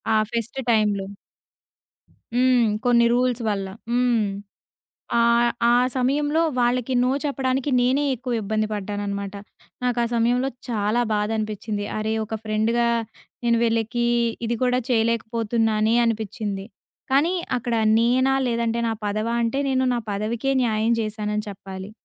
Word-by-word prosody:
ఆ - - +5 0.2
ఫెస్ట్ 235 +3 -3
టైమ్‌లో. 205 -3 +1 1.3
హ్మ్. 250 -2 +4 0.2
కొన్ని 235 -1 +4
రూల్స్ 245 -1 +1
వల్ల. 195 -2 -2 0.2
హ్మ్. 240 -3 +2 0.9
ఆహ్, 235 0 +4 0.2
ఆ - - +5 0.2
సమయంలో 290 +5 +1 0.2
వాళ్ళకి 245 +1 +1
నో 250 - +2
చెప్పడానికి 270 -1 -1
నేనే 260 +4 +2
ఎక్కువ 250 +1 -4
ఇబ్బంది 215 +1 -1
పడ్డాన్ననమాట. 200 -1 -4 0.5
నాకా 245 -1 +1
సమయంలో 245 +3 +2 0.2
చాలా 215 +1 +1
బాధ 210 0 0
అనిపిచ్చింది. 215 -1 -3
అరే! 215 +1 -1
ఒక 220 - -4
ఫ్రెండ్‌గా 220 +2 +1 0.6
నేను 235 0 +3
విళ్ళకి 230 +1 0 0.4
ఇది 235 +1 -1
కూడా 250 0 +2
చేయలేకపోతున్నానే 225 -1 +1
అనిపిచ్చింది. 210 -3 -3 0.5
కానీ 295 +7 +3 0.2
అక్కడ 240 0 -2 0.2
నేనా 255 +3 +3
లేదంటే 235 0 0
నా 225 - 0
పదవా 215 +3 -1
అంటే 235 +4 0
నేను 260 -1 +1
నా 240 - 0
పదవికే 220 +6 -1
న్యాయం 225 0 +1
చేసానని 210 -1 -3
చెప్పాలి. 195 0 -8
230 Hz, 120 wpm, -23 LUFS, 215-245 Hz, 1.3 s, ఆ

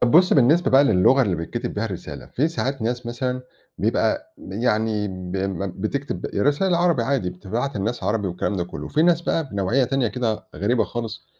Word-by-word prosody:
طَب 120 - +3
بُصّ، 180 +3 +6
بالنسبة 150 +7 +4
بقى 135 +2 +6
للغة 130 +4 +5
اللي 95 -8 0
بيتكتِب 120 +9 -4
بها 105 +2 -1
الرسالة، 95 -5 -6
في 150 +6 0
ساعات 135 -6 -2
ناس 120 +1 -2
مثلًا 125 +1 -2 0.4
بيبقى - - 0
يعني 105 0 0
ب 90 0 -5
م 95 -1 -2
بتكتب 110 -3 -3
رساليل 145 - +2
عربي 170 -7 +2
عادي 125 -9 0
بتبعت 115 +9 -3
للناس 110 +3 -2
عربي 105 -1 0
والكلام 90 +3 -2
ده 85 - -1
كلّه 90 - -7
وفي 155 - +1
ناس 170 -1 +4
بقى 160 -4 -1
بنوعيّة 100 +7 +1
تانية 130 -2 +1
كده 110 -1 -2
غريبة 115 +4 +2
خالص 115 -2 -6
120 Hz, 185 wpm, -23 LUFS, 100-135 Hz, 0.4 s, بُصّ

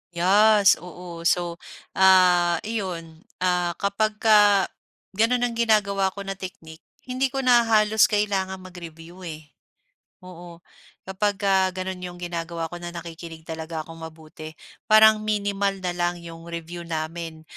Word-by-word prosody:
Yes, 205 +3 +5
oo. 175 0 -10
So, 175 0 0 0.4
ah, 180 -2 +5
iyon, 175 -7 -5 0.2
ah, 180 -1 +1
kapagka 210 0 +3 0.5
gano'n 235 +4 +2
ang 240 -1 -1
ginagawa 200 -4 +2
ko 200 - -6
na 195 0 -5
technique, 165 -4 -10 0.2
hindi 255 +1 0
ko 270 0 -2
na 245 -2 +5
halos 215 -1 +4
kailangang 190 -3 -1
mag-review, 175 0 -11
eh, 155 -2 -10 0.7
oo. 175 -1 -12 0.4
Kapag 200 +2 -1
ka 195 0 +1 0.2
gano'n 185 0 -5
yung 180 -1 -7
ginagawa 170 -1 -5
ko 175 - -7
na 175 - -7
nakikinig 165 -1 -9
talaga 160 0 -6
akong 165 +1 -12
mabuti 155 0 -12 0.3
parang 215 0 +6
minimal 200 -2 -2
na 180 - -1
lang 175 0 -1
yung 165 0 -11
review 170 0 -7
namin. 160 0 -5
180 Hz, 135 wpm, -24 LUFS, 170-205 Hz, 0.7 s, parang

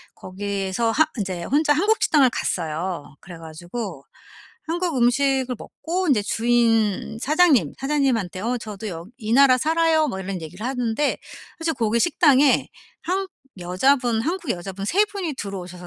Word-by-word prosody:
거기에서 200 +3 -2
하 315 +7 +4
인제 185 -4 -3
혼자 295 - +2
한국 410 +9 +1
식당을 280 -5 +4
갔어요. 165 -5 -3
그래 175 -2 -11
가지고 165 - -7 0.6
한국 340 -2 -2
음식을 260 +1 +2
먹고 360 +2 -4
인제 245 -8 +3
주인 225 -1 +1
사장님. 305 -1 +3
사장님한테 265 -10 0
어 240 +4 -1
"저도 215 -1 -7
여 165 -3 -7
이 215 0 -3
나라 260 0 +6
살아요." 320 +1 +2
뭐 190 - -4
이런 190 -1 -5
얘기를 180 +7 -8
하는데 250 +1 -1 0.4
사실 325 -1 -1
거기 230 -1 0
식당에 290 -4 +4 0.3
한 380 +3 -1 0.3
여자분 225 +7 +1
한국 340 0 -3
여자분 190 +1 -4
3 400 - +3
분이 390 -7 -4
들어오셔서 180 -5 -7
235 Hz, 315 characters per minute, -22 LUFS, 190-295 Hz, 0.6 s, 나라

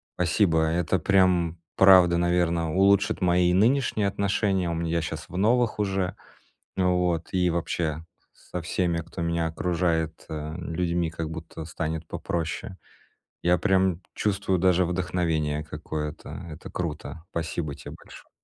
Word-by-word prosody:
Спасибо. 85 -2 +2
Это 85 +2 +1
прям 90 -2 +3 0.2
правда, 90 -3 +7
наверно, 85 -2 +1
улучшит 100 +1 +3
мои 90 0 +3
нынешние 110 0 +2
отношения. 100 -2 0
У 85 - -1
мн 85 0 -2
я 85 0 0
щас 80 0 -5
в 90 - -6
новых 115 +2 +2
уже, 95 -2 -1 0.6
вот, 90 -2 +1
и 90 -1 +2
вообще 80 -2 -2 0.3
со 90 - -7
всеми, 85 0 0
кто 85 +2 -7
меня 85 0 0
окружает, 80 -1 -1
э, - - -5
м 80 +3 -5
людьми, 85 -1 0
как 80 -1 -4
будто 80 0 -7
станет 80 0 -4
попроще. 85 +2 -4 0.7
Я 90 +1 +4
прям 95 -2 +2
чувствую 95 -2 0
даже 90 0 +4
вдохновение 85 -4 -1
какое-то. 75 0 -6 0.2
Это 75 - -9
круто! 80 -1 -5
Спасибо 80 -3 -3
те - - -10
большое! - - -14
85 Hz, 135 wpm, -26 LUFS, 80-95 Hz, 0.7 s, правда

